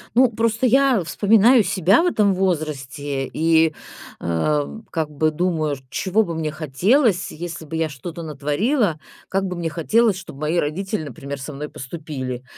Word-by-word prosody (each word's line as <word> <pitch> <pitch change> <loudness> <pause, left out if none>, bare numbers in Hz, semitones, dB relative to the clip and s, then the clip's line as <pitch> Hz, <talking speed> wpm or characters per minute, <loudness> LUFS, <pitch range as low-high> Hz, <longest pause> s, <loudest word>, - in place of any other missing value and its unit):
Ну, 255 -1 +6
просто 225 +2 0
я 260 -5 +4
вспоминаю 225 +5 +5
себя 195 - +3
в - - +1
этом 210 - +3
возрасте 145 -6 -2
и, 160 0 +3 0.5
а, 145 - 0 0.2
как 160 -3 -1
бы 155 +1 0
думаю, 155 -3 -1
чего 210 +4 +1
бы 170 -4 -5
мне 155 -2 -2
хотелось, 180 - +1
если 165 0 -7
бы 160 - -6
я 160 -1 +1
что-то 160 +5 -8
натворила, 160 - 0 0.3
как 195 0 0
бы 180 -1 -3
мне 170 -1 -2
хотелось, 200 +6 +2
чтобы 150 -5 -10
мои 155 +3 0
родители, 185 +4 -1
например, 140 +1 -7
со 145 +2 -7
мной 150 +2 -6
поступили. 130 -3 -6
165 Hz, 155 wpm, -21 LUFS, 150-200 Hz, 0.5 s, Ну